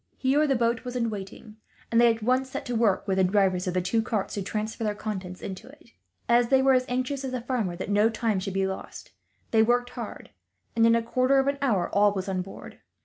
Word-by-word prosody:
Here 285 +3 +2
the 270 - +2
boat 235 -1 0
was 250 0 -6
in 230 -2 0
waiting, 210 +2 -9 0.3
and 230 0 +4
they 235 -1 +6
at 225 -1 -5
once 255 +3 +1
set - - -5
to 245 -2 -3
work, 220 -3 +1
with 190 -1 +1
the - - +4
drivers 185 -1 +2
of 180 - -2
the 180 - +1
two 225 +5 +1
carts, 220 -3 -2
to 200 - -3
transfer 215 +3 -4
their 210 -1 -1
contents 190 -4 -6
to 195 +4 -7
it. 265 -3 -17 0.4
As 235 0 +4
they 265 +1 +3
were 270 0 +5
as 255 0 +2
anxious 255 +2 -2
as 265 - -4
the 255 - -1
farmer 230 -8 -2
that 175 - -5
no 210 +2 +4
time 225 -3 -1
should 190 0 -5
be 195 0 +1
lost, 190 0 -7 0.4
they 225 - +4
worked 245 +2 +2
hard, - - -8 0.4
and 230 0 +5
in 230 - +5
a 230 - +1
quarter 255 +3 +2
of 270 - +3
an 280 0 -1
hour 215 -10 +1
all 205 0 +4
was 190 -1 -4
on 190 -1 -1
board. 195 +2 -11
225 Hz, 250 wpm, -26 LUFS, 195-250 Hz, 0.4 s, they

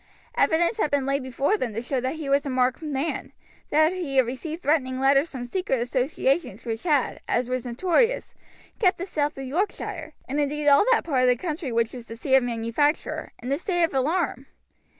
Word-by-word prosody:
Evidence 340 +7 +2
had 305 - +2
been 285 -2 +1
laid 275 +1 0
before 265 - 0
them 240 - -3
to - - -1
show 255 0 -1
that 260 +4 -2
he 310 -3 -6
was 280 +1 +3
a 280 - -4
marked 255 +1 +1
man, 300 0 -3 0.4
that 315 +3 +4
he 325 -8 -3
had 260 - +6
received 310 +7 -5
threatening 260 -4 +1
letters 275 +3 +4
from 250 -3 -6
secret 315 -3 -1
associations 255 - -1
which 225 -1 -3
had, 295 -7 +1
as 240 0 +1
was 255 -1 -2
notorious, 375 - +1 0.5
kept 370 -4 +3
the 360 - -4
south 295 -7 -1
of 270 - -5
Yorkshire, 330 +1 -3
and 280 +3 -2
indeed 295 +1 -1
all 285 +3 +7
that 465 - +4
part 270 -6 +1
of 255 - +4
the 250 - +4
country 300 0 -4
which 230 0 0
was 240 -2 -9
the 225 - -7
seat 260 +4 -2
of 265 - +7
manufacture, 240 +5 -1
in 250 - -3
a 280 - +1
state 350 -1 0
of 330 - +1
alarm. 275 -1 0
275 Hz, 210 wpm, -25 LUFS, 255-320 Hz, 0.5 s, all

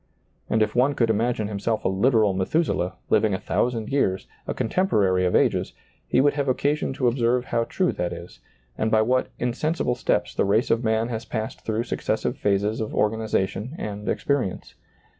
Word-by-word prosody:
And 110 0 +3
if - - -2
one 135 +4 +2
could 115 -3 +2
imagine 110 0 0
him 100 -1 -4
self 110 +2 -1
a - - +4
literal 105 +1 +3
Methuselah, 95 - 0 0.2
living 105 -3 +3
a - - -4
thousand 115 -3 -1
years, 95 -9 0 0.2
a - - -1
contemporary 100 - +2
of 90 - 0
ages, - - +2 0.3
he - - +2
would 145 +2 +4
have 140 -1 -1
occasion 145 +4 0
to 130 -2 0
observe 120 0 +1
how 115 -3 0
true 185 +6 0
that 90 - -3
is, 85 -8 -9 0.4
and 110 - +1
by 110 0 +4
what 130 +3 +1
insen 125 +6 -1
sible 125 -7 -1
steps - - 0
the - - +1
race 105 +5 +2
of 115 +2 +2
man 110 +1 +1
has 115 -1 -3
passed 110 -2 -5
through 110 +1 -1
successive - - -2
phases 105 +2 0
of 110 - -4
organization 110 - -1
and 105 0 -5
experience. 135 -10 -1
110 Hz, 185 wpm, -24 LUFS, 105-125 Hz, 0.4 s, a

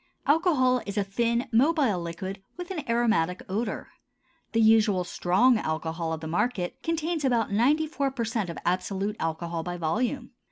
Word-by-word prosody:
Alcohol 280 -5 +3
is 200 +1 -5
a 205 - +3
thin, 235 +4 0
mobile 255 - +3
liquid 185 +4 -5 0.2
with 355 +1 -6
an 320 -6 -3
aromatic 220 -7 +1
odor. 210 +5 -3 0.6
The 230 - +1
usual 220 -4 +4
"strong" 195 +7 +3
alcohol 160 0 -3
of 160 -1 -3
the 160 - -5
market 180 +2 -1
contains 330 -1 -1
about 235 -6 +1
ninety 275 +10 +3
four 280 -3 -1
per 255 -3 -3
cent 220 -5 -2
of 170 - -6
absolute 195 +3 -1
alcohol 165 +1 -2
by 175 +1 -5
volume. 245 - -1
220 Hz, 160 wpm, -27 LUFS, 180-255 Hz, 0.6 s, usual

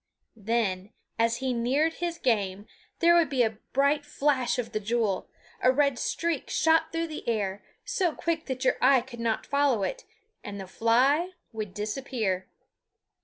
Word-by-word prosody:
Then, 210 -3 -1 0.3
as 230 0 +2
he 260 -1 -1
neared 270 +7 +1
his 340 0 -3
game, 205 - 0 0.4
there 340 0 +6
would 340 -4 +4
be 260 -3 +2
a 220 -1 -2
bright 280 +2 +2
flash 280 -4 0
of 245 -2 -3
the 215 - -1
jewel; 215 -2 -1 0.3
a 255 - +5
red 280 -1 +2
streak 335 -4 -2
shot 320 0 +3
through 330 0 -1
the 310 -6 -6
air, 205 -3 -1 0.2
so 360 -4 +1
quick 330 +1 -2
that 260 -1 -3
your - - +3
eye 260 0 +6
could 240 -1 -11
not 230 -1 -1
follow 280 -7 +2
it, - - -3 0.4
and 200 -1 -6
the 190 - -6
fly 260 - +2 0.2
would 215 -4 -5
disappear. 210 -3 -2
250 Hz, 165 wpm, -27 LUFS, 220-295 Hz, 0.4 s, there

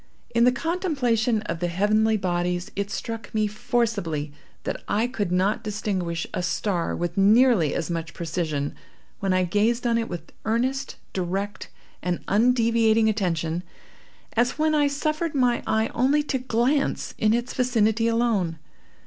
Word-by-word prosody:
In 235 +1 +4
the 250 - +6
contemplation 255 - 0
of 170 - -4
the 175 - 0
heavenly 215 +5 +2
bodies 175 -1 -1
it 200 0 -2
struck 225 0 -5
me 215 0 +2
forcibly 210 -9 -1 0.3
that - - -3
I 215 +3 +1
could 215 -7 -2
not 195 +5 +1
distinguish 190 -6 -2
a - - -1
star 180 0 -1
with 175 +2 -2
nearly 210 - +5
as 170 - -2
much 165 -2 -4
precision, 155 -4 -2 0.5
when 195 -2 0
I 185 0 +3
gazed 215 +7 +1
on 230 -1 +2
it 230 - -3
with 170 -2 -7
earnest, 250 +5 -1 0.2
direct 190 +2 -3 0.3
and 180 -1 -2
undeviating 225 0 +3
attention, 170 -5 -1 0.7
as 240 +2 +1
when 310 0 +2
I 295 -1 +4
suffered 305 +3 -1
my 250 -3 +2
eye 220 0 +1
only 275 +5 +2
to 270 -2 -1
glance 255 +3 0
in 215 - +3
its 240 +2 0
vicinity 230 -3 +2
alone. 225 -8 +1
220 Hz, 150 wpm, -25 LUFS, 180-240 Hz, 0.7 s, the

